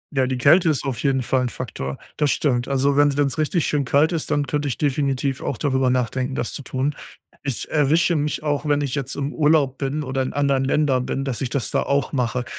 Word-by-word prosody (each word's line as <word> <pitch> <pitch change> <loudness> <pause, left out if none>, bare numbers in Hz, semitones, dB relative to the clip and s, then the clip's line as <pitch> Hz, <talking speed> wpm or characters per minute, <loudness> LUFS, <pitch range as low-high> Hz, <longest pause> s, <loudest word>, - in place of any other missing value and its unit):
Ja, 130 -1 +2
die 130 -1 -2
Kälte 165 +7 +5
ist 150 -5 0
auf 125 -3 -3
jeden 135 -3 +1
Fall 130 +1 +1
'n 125 - -1
Faktor. 70 - -5 0.2
Das 150 -2 +2
stimmt. 125 -4 0
Also, 140 +1 +1
wenn's 145 0 +3
wenn's 140 -1 0
richtig 155 +1 +1
schön 145 -1 0
kalt 145 +5 +3
ist, 165 -3 -2
dann 145 -1 +1
könnte 145 0 -2
ich 130 - -2
definitiv 140 -2 0
auch 130 - -3
darüber 130 -1 +1
nachdenken, 130 +1 -1
das 120 - -3
zu - - -6
tun. 135 +2 -2 0.5
Ich 135 -5 -3
erwische 160 +3 +3
mich 150 0 -1
auch, 150 0 -1
wenn 145 0 +2
ich 140 -3 -2
jetzt 140 -4 -3
im 140 +1 -3
Urlaub 150 -4 +2
bin 140 +2 -2
oder 135 -1 -2
in 130 - -2
anderen 140 -2 +1
Ländern 135 -2 +1
bin, 135 - -2
dass 130 -4 -3
ich 130 - -1
das 135 -1 -2
da - - +1
auch 140 -1 0
mache. 125 -1 -1
140 Hz, 235 wpm, -22 LUFS, 130-145 Hz, 0.5 s, Kälte